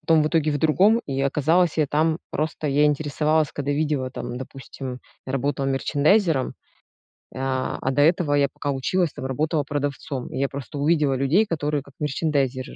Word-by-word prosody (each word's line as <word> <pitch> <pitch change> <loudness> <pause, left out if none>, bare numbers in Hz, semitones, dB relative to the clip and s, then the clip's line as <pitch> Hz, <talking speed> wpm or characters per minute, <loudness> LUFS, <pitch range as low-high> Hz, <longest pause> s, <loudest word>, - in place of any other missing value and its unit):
потом 160 -2 +3
в 155 - +1
итоге 155 -2 +1
в 145 - -1
другом. 195 - +4
И, 135 -1 -2
оказалось, 155 +5 +2
я 155 -2 +2
там 160 +3 +1
просто, 155 0 -2
я 145 +2 +3
интересовалась, 150 +1 +1
когда 145 0 -2
видела, 145 -3 -1
там, 120 0 -5
допустим, 130 0 -8 0.3
я 130 - -4
работала 135 0 -1
мерчандайзером, 145 +3 +2 0.8
а, 130 0 -2
а 130 - 0
до 145 +2 +3
этого 160 -2 +3
я 140 -1 +3
пока 145 - -4
училась, 160 +5 0
там, - - -7
работала 150 +4 0
продавцом. 140 -2 -4
И - - -5
я 140 0 +1
просто 140 +2 -7
увидела 150 -2 +2
людей, 155 +12 +2
которые 150 -3 -1
как 140 0 -18
мерчандайзеры 140 -3 -1
145 Hz, 175 wpm, -23 LUFS, 135-155 Hz, 0.8 s, другом